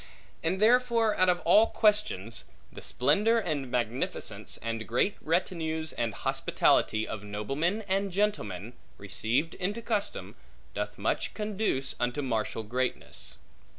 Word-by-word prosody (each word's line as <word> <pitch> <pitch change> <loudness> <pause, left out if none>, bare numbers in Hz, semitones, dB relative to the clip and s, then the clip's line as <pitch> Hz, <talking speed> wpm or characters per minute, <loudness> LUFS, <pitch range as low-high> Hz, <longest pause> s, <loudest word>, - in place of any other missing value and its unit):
And 175 +3 0
therefore 230 -1 +4
out 185 0 +4
of 175 0 +2
all 220 +2 +6
questions, 205 - +1 0.3
the - - -9
splendor 210 - +2
and 150 - -2
magnificence, 120 0 -2
and 115 -1 -3
great 125 - +1
retinues 160 -2 -1
and 115 -3 -2
hospitality, 110 0 +2
of 105 -2 -5
noblemen 135 - -1
and 195 0 0
gentlemen, 120 - -1 0.2
received 115 - -1
into 205 +5 -3
custom, 215 -3 -2 0.4
doth - - -4
much - - -1
conduce 210 -10 -1
unto 125 +4 -1
martial 115 -3 -1
greatness. 125 +4 -4
160 Hz, 120 wpm, -29 LUFS, -, 0.4 s, all